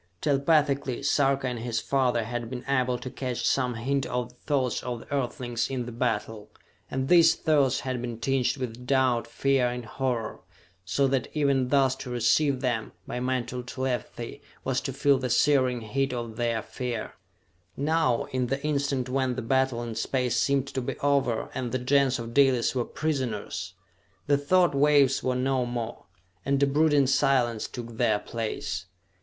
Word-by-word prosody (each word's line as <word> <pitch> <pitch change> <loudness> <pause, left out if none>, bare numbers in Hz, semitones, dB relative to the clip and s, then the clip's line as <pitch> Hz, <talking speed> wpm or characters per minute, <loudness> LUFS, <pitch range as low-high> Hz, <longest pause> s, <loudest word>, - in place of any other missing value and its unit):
Telepathically, 140 -2 +1
Sarka 140 -1 +2
and 125 -2 -3
his 115 -1 -2
father 125 -2 +1
had 120 0 -4
been 125 -1 -6
able 130 -2 +1
to 130 - -7
catch 125 -1 -2
some 125 -3 +1
hint 135 +4 -1
of 125 -1 -2
the 125 - -21
thoughts 130 -5 +1
of 120 -2 -4
the - - -9
Earthlings 125 -3 -2
in 130 -3 -3
the 120 - -6
battle, 110 -3 -2 0.4
and 130 0 -2
these 170 -1 +6
thoughts 145 -5 +2
had 130 -2 -3
been 120 -2 -4
tinged 130 +3 0
with 125 -1 -6
doubt, 130 -3 +2
fear 135 -2 +1
and 120 -1 -4
horror, 120 -2 -2 0.4
so 120 +10 +1
that 130 -2 0
even 140 -4 +2
thus 135 0 +3
to 125 - -7
receive 130 +3 +2
them, 120 -4 -1
by 125 - -4
mental 125 -1 -2
telepathy, 125 -2 -4 0.2
was 130 0 0
to 135 - -3
feel 140 0 +3
the 130 -1 -2
searing 130 -1 +3
heat 135 +5 -1
of 120 -2 -4
their 115 -2 -1
fear. 115 0 -4 0.6
Now, 145 -4 +1
in 130 -1 0
the 135 +2 -1
instant 140 -3 0
when 130 -1 0
the 130 - -4
battle 130 0 +1
in 115 -1 -5
Space 125 +2 -1
seemed 140 -1 +2
to 130 - -3
be 120 - -4
over 140 -5 +1
and 125 -2 -3
the 130 - 0
Gens 135 +1 +2
of 115 -1 -6
Dalis 130 -4 +4
were 125 -3 -1
prisoners, 110 - -3 0.5
the 145 0 +3
thought 175 +4 +3
waves 140 -1 +4
were 130 0 0
no 130 0 +1
more, 120 -1 -5 0.4
and 140 0 +1
a - - +7
brooding 145 0 +3
silence 125 -4 +2
took 120 -2 -8
their 115 -4 +3
place. 105 -4 -4
130 Hz, 170 wpm, -27 LUFS, 120-135 Hz, 0.6 s, a